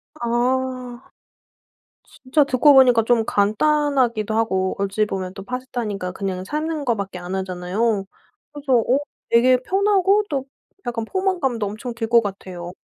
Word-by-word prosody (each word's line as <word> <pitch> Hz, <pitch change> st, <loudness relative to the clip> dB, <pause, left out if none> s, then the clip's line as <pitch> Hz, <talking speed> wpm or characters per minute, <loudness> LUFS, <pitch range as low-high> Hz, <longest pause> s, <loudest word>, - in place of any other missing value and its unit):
아 250 Hz, 0 st, -2 dB, 0.9 s
진짜 280 Hz, +3 st, 0 dB
듣고 280 Hz, +2 st, +4 dB
보니까 250 Hz, -4 st, +6 dB
좀 230 Hz, -1 st, +2 dB
간단하기도 240 Hz, 0 st, +1 dB
하고 190 Hz, -4 st, 0 dB
어찌 200 Hz, +2 st, 0 dB
보면 185 Hz, -3 st, -4 dB
또 195 Hz, 0 st, -9 dB
파스타니까 235 Hz, -6 st, -4 dB
그냥 190 Hz, -2 st, -4 dB
삶는 305 Hz, +4 st, -3 dB
거밖에 200 Hz, -6 st, -2 dB
안 180 Hz, +2 st, -5 dB
하잖아요. 190 Hz, +3 st, -1 dB, 0.5 s
그래서 285 Hz, -3 st, -2 dB
어 245 Hz, +4 st, +2 dB, 0.3 s
되게 250 Hz, +2 st, +5 dB
편하고 395 Hz, +4 st, +2 dB
또 270 Hz, -2 st, -2 dB, 0.4 s
약간 230 Hz, -2 st, -2 dB
포만감도 305 Hz, -, -1 dB
엄청 220 Hz, +4 st, -6 dB
들 230 Hz, -1 st, -4 dB
것 235 Hz, 0 st, +5 dB
같아요. 185 Hz, -4 st, -7 dB
235 Hz, 285 characters per minute, -21 LUFS, 200-265 Hz, 0.9 s, 보니까